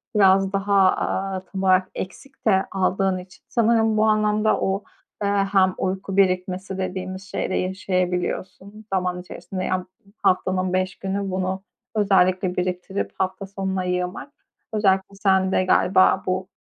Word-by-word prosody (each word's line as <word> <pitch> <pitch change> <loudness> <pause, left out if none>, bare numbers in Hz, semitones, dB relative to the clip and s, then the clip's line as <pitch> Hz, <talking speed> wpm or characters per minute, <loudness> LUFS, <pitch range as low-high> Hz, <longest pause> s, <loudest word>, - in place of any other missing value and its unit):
biraz 195 -1 +4
daha, 200 +1 +1 0.2
aaa, 190 0 -2
tam 195 -1 -3
olarak 185 0 +3
eksik 270 +8 -8
de 190 -3 +3
aldığın 190 0 +1
için 180 0 -12
sanırım 225 -2 +2
bu 215 - +4
anlamda 215 0 +2
o, 195 +1 0 0.4
eee, 200 - +1 0.2
hem 190 -2 +4
uyku 190 +1 -3
birikmesi 185 0 +1
dediğimiz 185 0 -4
şeyi 205 - -3
de - - -2
yaşayabiliyorsun 185 +2 -2
zaman 180 -1 0
içerisinde. 185 +1 -6
Ya, 185 - 0
bu, 185 +2 -22
haftanın 185 0 +1
5 185 0 0
günü 195 0 -2
bunu 185 +1 -2 0.3
özellikle 185 -3 +3
biriktirip 180 +2 -2
hafta 190 +1 -2
sonuna 190 -1 -3
yığmak, 180 +7 -3 0.4
özellikle 195 -2 +1
sende 190 -1 +2
galiba 185 +1 +4
bu 185 0 -1
190 Hz, 135 wpm, -23 LUFS, 185-195 Hz, 0.4 s, biraz